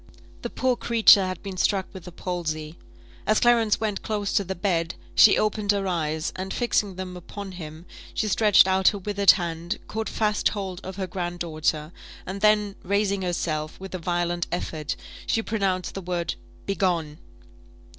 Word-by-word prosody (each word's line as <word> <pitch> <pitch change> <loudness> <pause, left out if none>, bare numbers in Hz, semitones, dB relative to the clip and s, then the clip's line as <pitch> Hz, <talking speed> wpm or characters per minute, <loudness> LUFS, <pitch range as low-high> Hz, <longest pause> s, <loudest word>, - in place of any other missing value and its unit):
The - - -4
poor 255 -1 +1
creature 225 -5 +6
had 185 -1 -5
been 195 -2 -6
struck 190 +1 +2
with 185 -3 -10
the 180 - -8
palsy. 160 -3 -4 0.5
As 215 - +4
Clarence 230 -3 +4
went 215 -3 -2
close 205 -2 -2
to 200 - +3
the 190 +1 -4
bed, 170 -3 0 0.2
she 210 - +7
opened 210 -1 +1
her 200 -1 -1
eyes, 160 -3 -1
and 190 +1 -5
fixing 210 -5 0
them 185 0 -6
upon 195 +2 -8
him, 160 -2 -9 0.3
she 215 - 0
stretched 210 -1 +5
out 190 0 +2
her 205 - +4
withered 200 0 0
hand, 170 +1 -3
caught 220 0 -3
fast 210 -1 +1
hold 190 -3 -5
of 190 0 -6
her 190 -1 -2
grand 175 -1 -4
daughter, 155 -2 -1 0.3
and 195 +2 -5
then 210 -1 +3
raising 200 +1 0
herself, 155 -4 -2
with 190 0 -8
a 185 - -3
violent 175 0 -1
effort, 155 -4 -3 0.3
she 225 - +1
pronounced 195 -5 -1
the 195 - -5
word 175 -2 -2 0.3
"Begone!" 175 -6 -1
190 Hz, 170 wpm, -25 LUFS, 175-205 Hz, 0.5 s, she